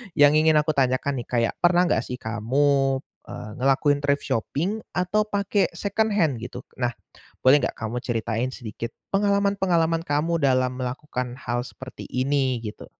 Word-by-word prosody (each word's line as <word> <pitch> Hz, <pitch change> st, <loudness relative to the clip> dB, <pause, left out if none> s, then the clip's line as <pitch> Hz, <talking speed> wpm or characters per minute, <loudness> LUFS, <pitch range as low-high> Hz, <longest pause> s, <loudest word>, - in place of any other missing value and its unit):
yang 145 Hz, -1 st, +7 dB
ingin 155 Hz, 0 st, +4 dB
aku 150 Hz, +1 st, +3 dB
tanyakan 135 Hz, -1 st, +1 dB
nih 120 Hz, -, -7 dB
kayak 115 Hz, -2 st, +1 dB
pernah 175 Hz, 0 st, +4 dB
nggak 110 Hz, -, +2 dB
sih 125 Hz, -, -4 dB
kamu, 135 Hz, +4 st, +1 dB, 0.3 s
eee, 120 Hz, -3 st, -7 dB
ngelakuin 135 Hz, +2 st, +3 dB
thrift 140 Hz, 0 st, 0 dB
shopping 170 Hz, -, -1 dB, 0.2 s
atau 195 Hz, +4 st, +1 dB
pake 200 Hz, -1 st, 0 dB
secondhand 200 Hz, -, +1 dB
gitu? 125 Hz, +2 st, -7 dB, 0.2 s
Nah, 125 Hz, -1 st, +1 dB, 0.5 s
boleh 140 Hz, +3 st, +6 dB
nggak -, -, -1 dB
kamu 115 Hz, +2 st, -3 dB
ceritain 115 Hz, +1 st, -1 dB
sedikit 115 Hz, -2 st, -6 dB, 0.2 s
pengalaman-pengalaman 195 Hz, -5 st, +2 dB
kamu 165 Hz, +2 st, 0 dB
dalam 130 Hz, -2 st, +2 dB
melakukan 125 Hz, -1 st, -4 dB
hal 120 Hz, -2 st, -2 dB
seperti 130 Hz, 0 st, -10 dB
ini 130 Hz, -1 st, +1 dB
gitu? 105 Hz, -2 st, -7 dB
140 Hz, 150 wpm, -24 LUFS, 125-165 Hz, 0.5 s, yang